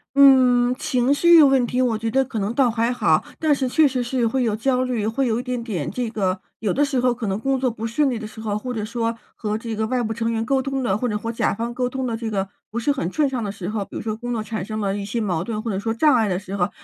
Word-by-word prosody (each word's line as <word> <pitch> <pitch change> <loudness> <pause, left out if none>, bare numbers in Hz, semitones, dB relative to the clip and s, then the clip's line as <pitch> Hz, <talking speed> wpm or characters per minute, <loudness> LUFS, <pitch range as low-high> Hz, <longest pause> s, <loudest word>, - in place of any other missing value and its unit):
嗯， 255 -3 +6
情 255 0 +1
绪 340 +3 +7
问 270 -3 +5
题 250 +2 0
我 235 -4 +1
觉 225 0 -3
得 270 0 +3
可 240 -3 -6
能 205 +2 -1
倒 255 -1 +3
还 230 +1 0
好。 - - +2 0.2
但 310 -2 +3
是 270 -2 -1
确 300 +4 +4
实 255 -2 -1
是 240 -1 0
会 255 +3 0
有 220 -3 +1
焦 255 +3 +1
虑， 235 -4 -1
会 265 +5 0
有 230 -1 0
一 - - -5
点 250 -2 -3
点 185 - -3
这 240 +4 -3
个 190 -4 -1 0.2
有 210 -4 0
的 290 +7 +2
时 270 -3 -1
候 250 0 +3
可 235 -1 -5
能 195 0 -1
工 270 +2 0
作 255 -2 +1
不 225 0 -4
顺 270 +4 +1
利 230 - -3
的 220 - -6
时 220 - -12
候， 215 -2 -2
或 250 +4 -4
者 215 -3 -3
说 230 0 -2 0.2
和 215 0 -2
这 225 0 -5
个 220 0 -1
外 250 0 0
部 220 0 -2
成 230 +1 -1
员 225 0 -1
沟 270 +1 +1
通 270 0 -2
的 190 -5 +1
或 245 +3 -1
者 210 - -1
和 230 +2 -4
甲 230 - 0
方 235 +2 -3
沟 250 0 -1
通 265 +1 -3
的 235 -2 -2
这 225 0 -4
个 195 -2 -1 0.2
不 220 - -6
是 265 +5 +1
很 190 - -2
顺 300 -2 +2
畅 255 -3 -3
的 205 - -3
时 190 -3 -7
候， 210 -2 -2
比 - - -13
如 - - -4
说 215 -1 -2
工 245 +2 -6
作 225 -2 -2
产 215 -2 -4
生 215 +2 -4
了 200 -1 -1
一 205 - -4
些 205 +4 -3
矛 180 -6 -1
盾， 215 +1 -4
或 230 - -2
者 190 - -2
说 225 +3 -2
障 280 +5 +4
碍 225 -3 +2
的 180 - 0
时 195 0 -6
候， 180 -3 +1
230 Hz, 335 characters per minute, -22 LUFS, 215-255 Hz, 0.2 s, 绪